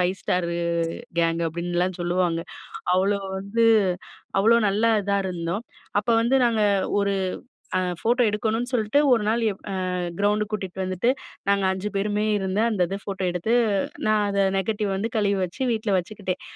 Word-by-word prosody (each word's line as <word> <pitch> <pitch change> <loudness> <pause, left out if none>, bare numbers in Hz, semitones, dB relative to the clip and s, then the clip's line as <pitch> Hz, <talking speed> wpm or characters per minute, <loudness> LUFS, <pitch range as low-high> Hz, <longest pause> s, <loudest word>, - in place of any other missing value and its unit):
5 180 0 +3
Starரு 170 -1 -1 0.6
gang 165 0 +1
அப்பிடின்லாம் 175 +2 -2
சொல்லுவாங்க. 175 -1 +1 0.6
அவ்ளோ 200 +2 +2 0.2
வந்து 200 +4 0 0.8
அவ்ளோ 225 +4 +5
நல்லா 215 +4 +2
இதா 200 0 0
இருந்தோம். 175 +3 -3 0.4
அப்ப 205 - -9
வந்து 240 +3 +2
நாங்க 230 -2 +2 0.4
ஒரு 200 0 +1 0.7
அ - - +2 0.2
ஃபோட்டோ 245 +2 +2
எடுக்கணுன்னு 225 +3 -1
சொல்லிட்டு, 225 +3 +2
ஒரு 230 - +2
நாள் 230 +2 +1
எ - - -5 0.2
அ - - -2 0.4
கிரவுண்டு 210 +1 +2
கூட்டிட்டு 190 -3 -3
வந்துட்டு, 185 +5 0 0.4
நாங்க 200 0 +3
5 190 +2 -4
பேருமே 205 +1 0
இருந்த 190 +1 -1
அந்த 205 -4 -1
இது 195 - -2
ஃபோட்டோ 195 -1 -4
எடுத்து, 180 +6 -1 0.5
நான் 215 -1 +3
அத 200 0 +2 0.2
நெகட்டிவ் 205 0 -1
வந்து 220 +4 -2
கழுவி 200 -2 +2
வச்சு, 180 +9 -11
வீட்ல 220 -1 -2
வச்சுக்கிட்டேன். 185 0 -5
200 Hz, 150 wpm, -24 LUFS, 185-215 Hz, 0.8 s, அவ்ளோ